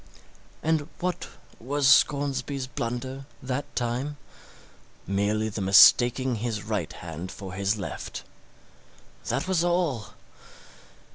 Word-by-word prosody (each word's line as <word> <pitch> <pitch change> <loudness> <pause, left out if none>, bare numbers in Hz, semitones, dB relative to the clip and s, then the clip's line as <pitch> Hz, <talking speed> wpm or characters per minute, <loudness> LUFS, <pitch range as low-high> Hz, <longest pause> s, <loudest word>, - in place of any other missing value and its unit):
And 155 -2 +1
what 180 0 -3 0.3
was 140 +3 0
Scoresby's 140 0 +3
blunder 130 +2 -5 0.2
that 130 +2 -4
time? 125 +4 -2 0.9
Merely 100 +3 0
the 105 -1 -4
mistaking 120 +6 +6
his 110 -2 -3
right 105 -7 -2
hand 85 +2 -7
for 95 -3 -8
his 100 +2 0
left 100 - -6 1.0
that 165 - -1
was 185 -3 +2
all. 175 - 0
125 Hz, 100 wpm, -26 LUFS, 105-140 Hz, 1.0 s, mistaking